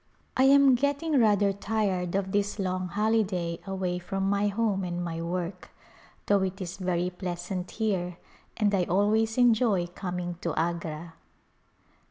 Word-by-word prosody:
I 260 - +4
am 275 0 +7
getting 285 +3 +1
rather 205 -3 +4
tired 195 -3 -1
of 195 -1 -1
this 205 +1 0
long 185 -2 -1
holiday 195 -4 0
away 185 -2 -2
from 195 +2 -2
my 200 +1 +2
home 205 -2 0
and 175 0 -3
my 165 -1 -4
work, 180 +2 -4 0.6
though 200 -1 +3
it 190 0 -2
is 185 0 -5
very 180 -1 -1
pleas 180 0 -5
ant 180 -1 -3
here 185 -6 -2 0.4
and 210 -2 +2
I 185 -3 +2
always 215 +5 +2
enjoy 225 -6 +4
coming 175 -1 -5
to 170 - -2
Agra. 165 -1 -3
190 Hz, 150 wpm, -28 LUFS, 175-210 Hz, 0.6 s, am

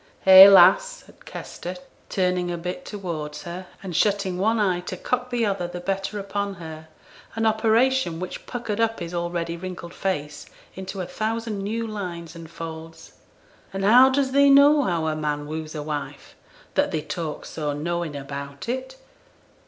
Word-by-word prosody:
'Hey, 190 +1 +11
lass!' - - +6
said - - -20
Kester, 180 +1 -7 0.3
turning 180 -2 0
a 175 - -3
bit 180 +10 -6
towards 160 -7 -6
her, 180 +1 -7 0.2
and 180 -3 -6
shutting 195 -1 +1
one 220 +3 +2
eye 185 -4 +1
to 180 +1 -6
cock 250 +6 -2
the 240 -2 0
other 195 -4 -1
the 175 0 -7
better 195 +3 -3
upon 200 0 -3
her; 160 -2 -9 0.5
an 225 0 0
operation 220 -3 +2
which 185 0 -7
puckered 230 -4 -4
up 225 0 +1
his 170 0 -6
already 170 -1 -2
wrinkled 175 -1 -8
face 150 -6 -3 0.3
into 190 +1 -6
a - - -3
thousand 220 +3 -3
new 225 +3 -2
lines 180 -6 -6
and 165 -1 -10
folds. 160 -1 -9 0.6
'An' 195 0 -3
how 245 +6 +7
does 265 0 0
thee 280 +1 +5
know 285 +2 +7
how 170 - -1
a 155 -1 -1
man 150 -1 -2
woos 155 +1 -6
a 150 - -4
wife, 145 -2 -6 0.4
that - - +2
thee 155 -2 -3
talks 165 -4 -5
so 150 -2 -3
knowin' 165 +1 -3
about 140 +2 -7
it? 260 +2 -4
185 Hz, 170 wpm, -24 LUFS, 165-220 Hz, 0.6 s, Hey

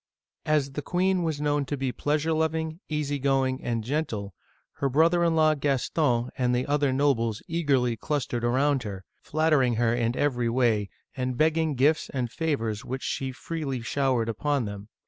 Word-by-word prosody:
As 150 -3 +2
the 145 - -4
queen 185 +3 +1
was 160 -4 -1
known 145 -1 +1
to 145 +2 -3
be 135 -1 -1
pleasure 150 +4 0
loving, 160 +1 -1
easy 145 -2 -1
going, 135 -1 +1
and 115 -2 -1
gentle, 110 - -3 0.4
her 140 - 0
brother 165 +5 +3
in 165 -1 +2
law 155 -1 +4
Gaston 135 -3 0
and 125 -1 +1
the 125 - 0
other 145 -1 +1
nobles 130 -6 +1
eagerly 135 -8 +1
clustered 120 -2 -2
around 135 +3 +2
her, 100 -4 -7 0.2
flattering 150 -6 +2
her 115 0 +2
in 120 0 0
every 125 -5 +1
way, 115 -5 +1 0.3
and 130 -2 -2
begging 160 -1 +2
gifts 145 +5 +2
and 125 -4 -3
favors 115 -10 -2
which 130 +1 -5
she 135 -1 -2
freely 135 -2 -4
show 135 +2 0
ered 115 -2 0
upon 140 +3 0
them. 100 0 -7
135 Hz, 170 wpm, -26 LUFS, 120-155 Hz, 0.4 s, law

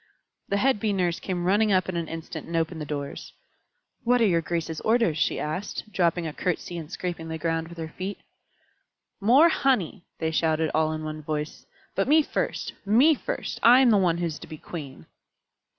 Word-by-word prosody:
The 200 - +1
head 260 +1 +2
Bee 210 0 0
Nurse 175 -3 0
came 180 -2 -3
running 205 +3 +3
up 185 -1 +3
in 185 - -3
an 170 -1 -2
instant 165 0 -7
and 165 - -5
opened 160 0 -1
the - - -3
doors. 140 -1 -5 0.7
"What 245 +1 +3
are 230 - +4
your 170 -5 +3
graces' 165 -1 -3
orders?" 220 -9 +2
she - - +1
asked, 185 +7 -4
dropping 175 -2 +1
a 155 - -4
curtsy 180 0 -3
and 160 0 -9
scraping 175 -3 -4
the 160 0 -4
ground 165 0 -1
with 170 +1 -12
her 160 -1 -5
feet. 190 +2 -4 1.0
"More 255 +11 +6
honey!" 215 - 0
they 160 -1 -1
shouted, 160 -1 +1
all 155 0 +2
in 155 0 -5
one 155 0 -5
voice. 150 0 -4 0.3
"But 195 - 0
me 310 +2 +5
first - - -3
me 240 +10 +5
first. - - -4
I 245 +3 +7
am 250 -3 +5
the 210 - +5
one 175 -3 +2
who 175 - -1
is 155 -3 -4
to - - -10
be 155 - -8
queen." 140 - -8
170 Hz, 200 wpm, -26 LUFS, 160-205 Hz, 1.0 s, I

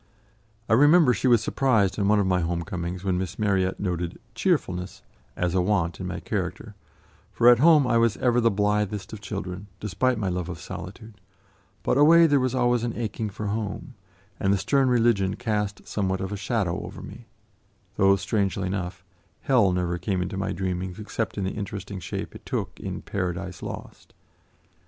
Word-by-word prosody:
I - - +2
remember 145 +2 +6
she 130 - 0
was 120 -3 +5
surprised 110 -7 +1
on 100 - +1
one 105 0 +4
of 100 - +2
my 90 -1 +2
home 85 0 -1
comings, 90 +1 -5
when 95 -2 0
Miss 95 0 -4
Marryat 95 -3 +1
noted 90 -2 -3 0.2
"cheerfulness" 95 - -1 0.3
as 90 -1 -1
a 95 - +3
want 90 -3 0
in - - -4
my - - -4
character, - - -4 0.6
for 120 - +3
at 120 -1 +6
home 155 -1 +6
I 120 -2 +3
was 115 -3 +2
ever 120 -1 +2
the 115 - +4
blithest 105 -1 -1
of 105 - -7
children, 100 -1 -5
despite 125 +4 0
my 105 -3 -2
love 90 -1 -2
of 85 - -6
solitude; 100 +7 -9 0.6
but 130 - +2
away, 165 +3 +7
there 145 -3 +4
was 130 0 0
always 120 -2 +2
an 120 -1 -3
aching 110 -1 -3
for 105 +2 -6
home, 105 +6 -4 0.5
and 95 - +2
the 100 - +3
stern 135 +6 +2
religion 115 -5 +2
cast 105 -3 -2
somewhat 95 -2 -1
of 95 +1 -4
a - - -2
shadow 100 -3 -1
over - - -9
me, - - -11 0.7
though, 95 0 +5
strangely 100 -1 -1
enough, 90 -1 -4 0.4
hell 115 -8 +3
never 90 -1 -1
came 95 +2 -1
into 90 - -5
my 95 0 -2
dreamings 90 -1 -3
except 110 +1 -4
in 100 - -1
the 95 - -1
interesting 100 -1 -6
shape 85 - -5
it - - -12
took - - -4
in - - -5
"Paradise 90 -1 -4
Lost." - - -9
100 Hz, 185 wpm, -25 LUFS, 95-115 Hz, 0.7 s, away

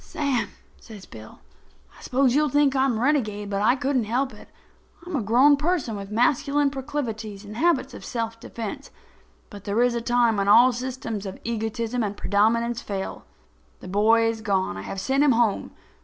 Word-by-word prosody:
"Sam," 265 -8 -2 0.3
says 210 -4 -12
Bill, 110 -1 -13 0.5
"I - - -17
suppose 255 -1 +1
you'll 300 +2 +2
think 285 0 +2
I'm 265 -3 +2
a - - -3
renegade, 215 -8 0
but 200 0 -1
I 240 +4 +4
couldn't 270 -3 0
help 255 +5 -1
it. - - -15 0.6
I'm 350 -2 -5
a 270 - 0
grown 255 +7 +5
person 300 -7 -1
with 200 -1 -7
masculine 280 +5 +1
proclivities 230 -7 -5
and 210 +1 -9
habits 275 -2 +1
of - - -10
self 230 -1 -4
defense, 230 +5 -7 0.6
but 200 -1 -11
there 210 +4 +1
is 245 -1 +2
a 235 - -2
time 240 -2 +2
when 200 0 0
all 240 +5 +7
systems 240 -4 -5
of 190 - -8
egotism 230 +1 -2
and 205 -2 -3
predominance 230 +3 +1
fail. 195 -2 -5 0.5
The - - -11
boy 215 +4 +3
is 225 -1 -1
gone. 190 - -1
I 95 - -6
have 190 - -6
sent 270 +8 +1
him 285 -3 +4
home. 230 -3 +1
235 Hz, 185 wpm, -24 LUFS, 210-265 Hz, 0.6 s, all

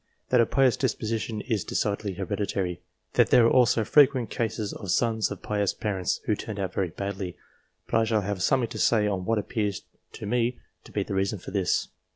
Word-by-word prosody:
That 125 -2 +5
a 115 - +2
pious 130 -2 +3
disposition 115 -3 -2
is 110 -7 -1
decidedly 100 -1 -1
hereditary. 95 -1 -2 0.3
That - - +4
there 120 - +6
are 115 - +4
also 120 -3 +4
frequent 135 -4 +4
cases 110 -2 -2
of 100 - -8
sons 110 +3 +1
of - - -7
pious 105 -2 0
parents 100 -5 -2
who 105 - +2
turned 105 0 -6
out 95 -2 -2
very 95 -2 0
badly; 95 0 -5 0.5
but - - +1
I 115 - +2
shall 110 -1 +1
have 100 -1 -3
something 125 +4 +2
to 110 - -6
say 110 -1 +3
on 95 -3 -1
what 115 +2 +1
appears 105 -2 -2 0.3
to - - -7
me 120 +3 0 0.3
to - - -13
be - - -1
the - - -6
reason 95 +2 0
for - - -9
this. 95 -3 0
105 Hz, 200 wpm, -26 LUFS, 100-115 Hz, 0.5 s, there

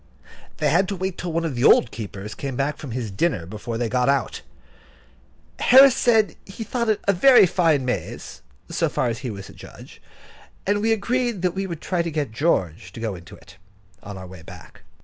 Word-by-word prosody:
They - - +1
had 185 +4 +3
to 200 - -3
wait 190 0 -4
till 175 - -4
one 165 +1 -1
of 160 - -2
the 120 0 -2
old 120 - +5
keepers 105 -1 -7
came 135 +3 -5
back 140 +3 -1
from 140 - -8
his 115 -3 -4
dinner 95 - -1
before 110 +5 -6
they 120 0 -1
got 125 +3 +1
out. 140 -1 0 1.2
Harris 265 0 +7
said 225 -3 +2
he 200 +4 -8
thought 235 +1 -2
it 215 - +2
was 200 - +4
a - - -11
very 260 -4 +7
fine 160 -6 +1
maze, 125 - -5 0.3
so - - -1
far 120 - -1
as 115 - -4
he 130 - -5
was 100 -2 -8
a - - -13
judge; - - -14 0.6
and 205 +1 +1
we 225 +1 +1
agreed 230 -1 -1
that 180 -2 +1
we 195 +1 -3
would 170 -3 -7
try 180 -2 -1
to 170 - -3
get 150 -6 -3
George 90 - -1
to - - -9
go 115 -3 -3
into 85 -3 -11
it, 95 - -18 0.4
on 100 -1 -9
our 95 - -8
way 90 -2 -12
back. - - -14
150 Hz, 215 wpm, -23 LUFS, -, 1.2 s, Harris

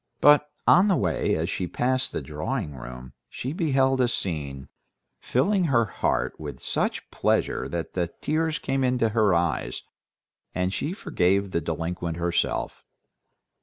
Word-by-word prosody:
But 150 0 +6 0.2
on 185 +3 +6
the 195 - +4
way, 90 - +1
as 80 +1 -1
she 90 -1 -2
passed 130 +6 0
the - - -4
drawing 75 - -3
room, 65 0 -9 0.2
she 130 +4 -4
beheld 135 -5 +2
a 125 - +4
scene, 75 - -3 0.5
filling 185 - +1
her 120 -7 +3
heart 100 - -1
with - - -7
such - - -2
pleasure 65 - 0
that 85 +1 -4
the 90 -2 0
tears 155 - -1
came 135 0 -1
into 125 -3 +2
her 105 -4 +3
eyes, 85 -2 -1 0.7
and 90 +1 0
she 150 - -2
forgave 100 - +1
the 85 - 0
delinquent 85 +1 -3
herself. 85 0 -1
100 Hz, 145 wpm, -26 LUFS, 85-135 Hz, 0.7 s, But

